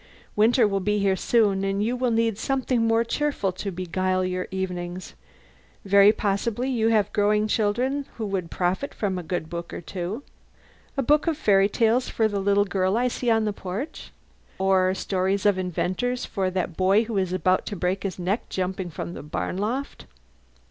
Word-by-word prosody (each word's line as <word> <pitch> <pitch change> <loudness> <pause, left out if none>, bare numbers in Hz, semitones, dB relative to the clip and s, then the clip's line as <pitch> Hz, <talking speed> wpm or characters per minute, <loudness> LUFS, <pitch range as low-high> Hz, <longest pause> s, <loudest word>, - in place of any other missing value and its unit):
Winter 225 +2 +4
will 195 -1 0
be 210 +2 0
here 195 -1 +2
soon, 200 -2 +2
and 195 +1 0
you 235 +3 0
will 250 0 0
need 225 -1 +1
something 255 -4 0
more 225 0 +3
cheerful 275 -5 -1
to 190 +2 -5
beguile 185 +1 -1
your 185 0 -2
evenings. 180 -2 -4 0.7
Very 200 +1 +7
possibly 215 +5 -1
you 225 -3 +1
have 215 -3 +2
growing 210 +1 +2
children 245 +7 0
who 225 - -3
would 190 -4 -3
profit 185 +12 -2
by - - -1
a 185 -1 -2
good 175 -1 -3
book 170 +1 -6
or - - -5
two. 185 - -5 0.7
A 275 - +1
book 300 +5 +3
of 320 -3 +1
fairy 200 -7 +4
tales 230 +3 +2
for 220 - +1
the 205 -2 -2
little 200 +1 +3
girl 190 +1 0
I 250 +1 +2
see 245 0 -2
on 225 -1 +3
the 210 - -1
porch? 200 - -6 0.5
Or 190 -1 +2
stories 190 +1 -1
of 200 -2 +3
inventors 185 +7 -1
for 190 -2 -1
that 185 -2 -2
boy 190 +5 +3
who 220 -3 -2
is 185 -2 -1
about 185 0 +1
to 205 - -3
break 180 +1 -1
his 195 -2 -4
neck 190 +5 -2
jumping 185 -1 -3
from 170 +2 -6
the - - -7
barn 150 +4 -4
loft? 245 +8 -3
200 Hz, 185 wpm, -25 LUFS, 185-225 Hz, 0.7 s, Very